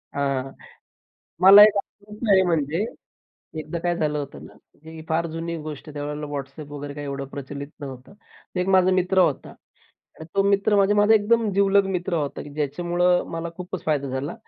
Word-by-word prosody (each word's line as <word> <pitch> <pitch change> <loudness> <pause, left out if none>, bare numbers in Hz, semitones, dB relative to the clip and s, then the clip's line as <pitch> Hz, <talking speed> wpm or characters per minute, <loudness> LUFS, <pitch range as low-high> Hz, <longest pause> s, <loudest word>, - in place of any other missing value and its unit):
हां, 135 -1 -1 0.9
मला 195 +3 +10
एक 210 -1 +3
अनुभव 210 +2 -5
आहे. 190 -1 +6
म्हणजे 165 +2 0 0.8
एकदा 155 +2 -5
काय 175 0 -1
झालं 150 -2 -1
होतं 140 -1 -7
ना, - - -16 0.3
की 160 0 -10
फार 165 +1 0
जुनी 165 +1 -4
गोष्ट 155 0 -8
आहे - - -9
त्यावेळेला 150 +1 -5
WhatsApp 140 +2 -7
वगैरे 145 0 -7
काय 145 0 -6
एवढं 140 -1 -4
प्रचलित 140 +1 -7
नव्हतं. 130 +3 -9 0.5
1 185 - -1
माझा 185 -1 +4
मित्र 185 +1 +1
होता 160 -7 +1
आणि 160 - -18
तो 195 - +4
मित्र 200 +1 +2
म्हणजे 200 +1 +3
माझा 210 +1 +5
एकदम 220 +1 +2
जीवलग 200 0 +3
मित्र 175 +1 -3
होता 145 -4 -2
की 145 - -11
ज्याच्यामुळं 175 +4 +1
मला 165 0 -4
खूपच 180 -1 -7
फायदा 145 -3 0
झाला. 130 - -4
165 Hz, 175 wpm, -23 LUFS, 145-190 Hz, 0.9 s, मला